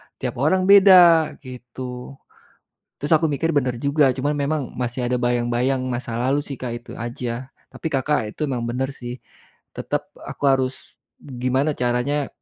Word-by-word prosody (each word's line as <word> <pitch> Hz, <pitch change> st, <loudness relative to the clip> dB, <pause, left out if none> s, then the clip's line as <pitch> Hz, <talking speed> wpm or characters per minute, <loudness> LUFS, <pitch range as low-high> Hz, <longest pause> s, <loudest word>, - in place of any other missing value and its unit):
tiap 125 Hz, -1 st, -5 dB
orang 160 Hz, +7 st, +2 dB
beda," 185 Hz, -5 st, +7 dB
gitu. 125 Hz, 0 st, -8 dB, 0.9 s
Terus, 145 Hz, +3 st, -2 dB
aku 155 Hz, -1 st, 0 dB
mikir, 160 Hz, +3 st, -1 dB
benar 125 Hz, -4 st, 0 dB
juga, 140 Hz, -1 st, +3 dB
cuma 145 Hz, +3 st, -2 dB
memang 145 Hz, -1 st, -2 dB
masih 120 Hz, 0 st, -2 dB
ada 125 Hz, -, +1 dB
bayang-bayang 120 Hz, +2 st, 0 dB
masa 120 Hz, -2 st, -3 dB
lalu, 135 Hz, +4 st, +1 dB
sih, 140 Hz, -4 st, -8 dB
Kak, 125 Hz, -2 st, -4 dB
itu -, -, -10 dB
aja. 120 Hz, +1 st, -5 dB, 0.2 s
Tapi, -, -, -8 dB
Kakak, 145 Hz, +1 st, +1 dB, 0.2 s
itu 155 Hz, -, -2 dB
memang 125 Hz, -5 st, -2 dB
benar, 130 Hz, +3 st, -2 dB
sih. 125 Hz, -2 st, -7 dB, 0.6 s
Tetap -, -, -4 dB
aku -, -, -8 dB
harus 130 Hz, -2 st, -2 dB, 0.2 s
gimana 130 Hz, +3 st, -1 dB
caranya 125 Hz, +4 st, 0 dB
130 Hz, 150 wpm, -22 LUFS, 125-145 Hz, 0.9 s, beda